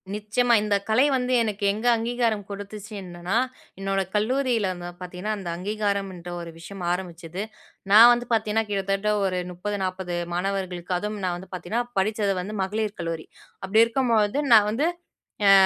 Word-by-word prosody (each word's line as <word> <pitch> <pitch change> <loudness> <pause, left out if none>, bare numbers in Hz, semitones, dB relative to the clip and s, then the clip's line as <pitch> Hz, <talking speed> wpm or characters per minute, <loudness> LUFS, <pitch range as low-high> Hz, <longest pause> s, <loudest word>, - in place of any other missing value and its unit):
நிச்சயமா. 220 +4 +1
இந்த 210 -1 +2
கலை 255 +6 +5
வந்து 255 0 -1
எனக்கு 210 -2 -3
எங்க 220 +4 -2
அங்கீகாரம் 230 -3 0
கொடுத்துச்சு 205 +1 -7
என்னன்னா, 175 +4 -2 0.4
என்னோட 195 0 0
கல்லூரியில 235 -1 +1
வந்து 175 0 -7
பாத்தீங்கன்னா, 180 +4 -4
அந்த 185 -3 -5
அங்கீகாரம்ன்ற 195 -2 -2
ஒரு 170 - -7
விஷயம் 195 +2 -8
ஆரம்பிச்சது. 175 0 -4 0.5
நான் 230 +3 +10
வந்து 240 0 -2
பாத்தீங்கன்னா, 220 0 +1
கிட்டத்தட்ட 195 +1 0
ஒரு 185 -1 0
30, 205 +4 -3
40 185 -1 -3 0.2
மாணவர்களுக்கு, 185 -1 -2
அதுவும் 210 0 -4
நான் 180 -1 0
வந்து 190 +2 -12
பாத்தீங்கன்னா, 210 +7 -2 0.2
படிச்சது 210 0 +1
வந்து 205 +4 -6
மகளிர் 210 +2 -2
கல்லூரி. 165 -1 -4 0.4
அப்டி 220 +4 +5
இருக்கும்பொழுது, 230 -1 +2
நான் 210 -2 +7
வந்து 285 +9 +1 0.6
அ, 195 - +8
205 Hz, 150 wpm, -25 LUFS, 185-220 Hz, 0.6 s, நான்